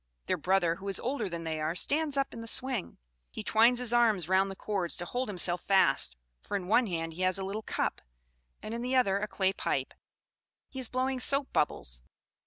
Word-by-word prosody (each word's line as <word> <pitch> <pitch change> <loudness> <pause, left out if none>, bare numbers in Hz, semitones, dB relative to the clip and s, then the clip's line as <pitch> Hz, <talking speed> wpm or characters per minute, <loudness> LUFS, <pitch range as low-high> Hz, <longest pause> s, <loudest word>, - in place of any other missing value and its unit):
Their - - 0
brother, 180 -3 +1
who 195 +1 -9
is 195 - +1
older 240 -5 -2
than 170 -1 -5
they 160 -1 -3
are, 155 +2 -1
stands 295 - 0
up 275 0 0
in 230 - -7
the 230 - -7
swing; 250 -3 -1 0.3
he 220 - -7
twines 230 +4 +4
his 245 -1 +1
arms 220 -8 +3
round 190 +1 +3
the 195 - -6
cords 190 -4 -2
to 175 - -3
hold 250 +6 -3
himself 180 -2 +4
fast, 190 - +3 0.3
for 205 - -3
in 180 -2 -7
one 230 +4 +3
hand 165 -3 -3
he 175 - -7
has 185 0 +3
a 190 - -3
little 200 +3 -4
cup, - - -2 0.6
and 215 - -5
in 235 - -3
the 250 +2 -1
other 200 -6 +3
a 210 - -2
clay 190 -2 0
pipe. - - -2 0.8
He 265 - -7
is 255 - -2
blowing 260 0 -1
soap 275 +2 +1
bubbles. - - 0
200 Hz, 215 wpm, -30 LUFS, 180-245 Hz, 0.8 s, twines